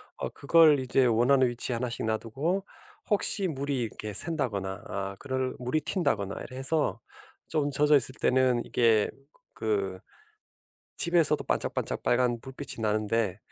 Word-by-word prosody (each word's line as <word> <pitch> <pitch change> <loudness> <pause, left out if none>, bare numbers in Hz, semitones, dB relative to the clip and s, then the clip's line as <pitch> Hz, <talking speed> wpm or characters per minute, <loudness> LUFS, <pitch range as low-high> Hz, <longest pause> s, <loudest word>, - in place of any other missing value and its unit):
어 - - -4
그걸 155 0 +4
이제 130 0 +2
원하는 125 +3 +3
위치에 120 +1 -1
하나씩 120 -1 -3
놔두고 135 - -2 0.4
혹시 200 -1 +4
물이 140 -3 -2
이렇게 110 -2 -5
샌다거나 105 - -1
아 100 0 -4
그럴 130 -2 -3
물이 125 +5 -1
튄다거나 100 - -1
이래 130 - -10
해서 135 -3 0 0.5
좀 145 -2 0
젖어있을 145 -3 +3
때는 130 -2 +2
이게 115 -3 +2 0.4
그 100 -4 -2 1.0
집에서도 170 -2 +3
반짝반짝 - - -2
빨간 120 -1 +1
불빛이 130 -2 -5
나는데 105 -2 0
125 Hz, 295 characters per minute, -28 LUFS, 110-145 Hz, 1.0 s, 그걸